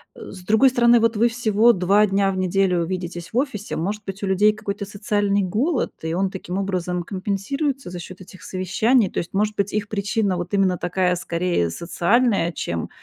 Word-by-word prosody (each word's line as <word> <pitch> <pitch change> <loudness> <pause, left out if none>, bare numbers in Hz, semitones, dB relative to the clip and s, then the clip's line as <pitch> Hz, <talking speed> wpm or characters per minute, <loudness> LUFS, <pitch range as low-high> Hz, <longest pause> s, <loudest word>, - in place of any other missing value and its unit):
Э. - - -10
С 185 -2 -11
другой 220 +5 +5
стороны, 240 -1 +4
вот 230 0 +2
вы 235 +2 +4
всего 230 0 +3
2 195 +3 +3
дня 195 0 +1
в 190 - -4
неделю 185 -2 +1
видитесь 175 0 -5
в - - -1
офисе, 235 -7 -2
может 205 +5 -3
быть, 195 +1 -6
у 200 - -2
людей 205 +3 +4
какой-то 205 -1 -5
социальный 205 0 0
голод, 240 - -1
и 160 0 -2
он 190 +2 0
таким 190 0 -5
образом 180 -2 -2
компенсируется 210 - -3
за 180 - -7
счёт 185 +2 -10
этих 185 0 -14
совещаний. 200 +4 +1
То - - -9
есть, 170 - -3
может 210 +1 0
быть, 200 0 -1
их 210 -1 -1
причина 200 -2 -1
вот 175 +3 -5
именно 190 -3 +2
такая 180 0 0
скорее 170 - -1
социальная, 185 - +1
чем, 85 - -4
195 Hz, 195 wpm, -22 LUFS, 180-215 Hz, -, другой